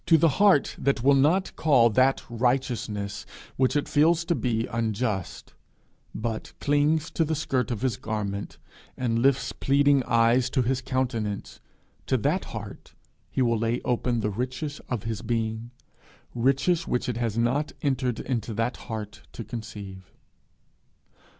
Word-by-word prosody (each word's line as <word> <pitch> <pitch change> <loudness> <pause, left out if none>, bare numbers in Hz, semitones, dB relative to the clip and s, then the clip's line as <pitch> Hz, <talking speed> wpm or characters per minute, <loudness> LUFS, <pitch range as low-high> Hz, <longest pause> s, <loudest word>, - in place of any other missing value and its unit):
To 165 - +7
the 165 +1 +4
heart 200 -9 +4
that 135 -3 0
will 140 +2 +6
not 155 +8 +2
call 125 -7 +4
that 130 +5 +3
righteousness 120 -4 -1 0.3
which 130 +1 +2
it 145 - +1
feels 165 +3 +3
to 170 - +1
be 115 -7 0
unjust, 110 -4 -3 0.6
but 110 0 -4
clings 150 +2 +1
to 165 - +1
the 160 0 -1
skirt 130 -6 -1
of 120 -1 -3
his 130 -5 0
garment, 100 -2 -4 0.4
and 115 -2 0
lifts 135 +2 +2
pleading 140 0 +3
eyes 115 +2 +3
to 130 -2 +1
his 130 +2 0
countenance 120 -6 -2 0.5
to - - +2
that - - 0
heart - - -9 0.3
he 130 - 0
will 115 -2 +1
lay 115 +2 0
open 120 -1 0
the 105 - -1
riches 130 +7 -4
of 120 -5 -2
his 110 -2 -3
being 115 0 -2 0.6
riches 140 +8 +1
which 125 - -1
it 125 -2 -2
has 115 -2 -2
not 130 +6 +1
entered 130 -4 0
that 115 -1 -2
heart 110 -3 -7
to 115 - -6
conceive. 105 -4 -8
125 Hz, 145 wpm, -26 LUFS, 115-140 Hz, 0.6 s, To